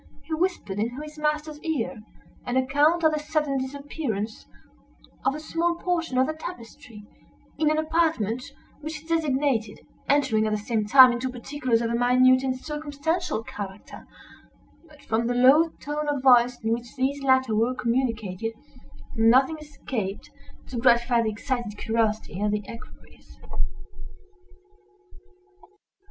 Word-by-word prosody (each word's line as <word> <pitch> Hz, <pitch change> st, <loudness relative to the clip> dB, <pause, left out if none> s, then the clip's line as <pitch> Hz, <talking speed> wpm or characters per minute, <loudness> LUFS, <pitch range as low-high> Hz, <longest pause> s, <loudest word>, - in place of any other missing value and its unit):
He 320 Hz, -, -6 dB
whispered 315 Hz, -, -1 dB
into 240 Hz, +5 st, -2 dB
his 305 Hz, 0 st, -10 dB
master's 300 Hz, 0 st, -1 dB
ear 275 Hz, -9 st, -3 dB, 0.5 s
an 245 Hz, +1 st, 0 dB
account 290 Hz, +6 st, +2 dB
of 315 Hz, -1 st, +4 dB
the 305 Hz, -, 0 dB
sudden 300 Hz, -2 st, -1 dB
disappearance 260 Hz, -, -4 dB, 0.8 s
of 275 Hz, -, +1 dB
a -, -, -5 dB
small 335 Hz, +2 st, -1 dB
portion 340 Hz, -6 st, -2 dB
of 260 Hz, -, +4 dB
the 310 Hz, -, -2 dB
tapestry, 250 Hz, -7 st, -10 dB, 0.6 s
in 310 Hz, -1 st, +3 dB
an 310 Hz, -, +1 dB
apartment 315 Hz, -8 st, 0 dB, 0.4 s
which 310 Hz, +1 st, -6 dB
he 315 Hz, +1 st, -11 dB
designated; 275 Hz, -9 st, 0 dB, 0.3 s
entering, 225 Hz, -7 st, +2 dB
at 215 Hz, -, -1 dB
the -, -, +1 dB
same 215 Hz, 0 st, -2 dB
time, 255 Hz, +2 st, +9 dB
into 240 Hz, +2 st, -2 dB
particulars 250 Hz, -1 st, -1 dB
of 230 Hz, -, -1 dB
a -, -, -1 dB
minute 255 Hz, +2 st, +4 dB
and 260 Hz, -1 st, -2 dB
circumstantial 300 Hz, -1 st, -3 dB
character; 200 Hz, -2 st, -9 dB, 0.8 s
but 295 Hz, -2 st, -18 dB
from 230 Hz, +1 st, 0 dB
the 245 Hz, -, 0 dB
low 275 Hz, +7 st, +6 dB
tone 295 Hz, +1 st, -4 dB
of 285 Hz, -3 st, -2 dB
voice 245 Hz, -1 st, +5 dB
in 225 Hz, +1 st, +1 dB
which 235 Hz, 0 st, -6 dB
these 275 Hz, +2 st, -1 dB
latter 260 Hz, -3 st, +3 dB
were 230 Hz, +4 st, +1 dB
communicated, 230 Hz, -4 st, -1 dB, 0.6 s
nothing 260 Hz, +7 st, +4 dB
escaped 240 Hz, -9 st, -5 dB, 0.3 s
to 245 Hz, -, -5 dB
gratify 240 Hz, 0 st, +4 dB
the 225 Hz, -, 0 dB
excited 235 Hz, -1 st, -4 dB
curiosity 220 Hz, -4 st, -1 dB
of 210 Hz, -, +1 dB
the 210 Hz, 0 st, -1 dB
equerries. 230 Hz, -, -13 dB
260 Hz, 140 wpm, -25 LUFS, 230-300 Hz, 0.8 s, time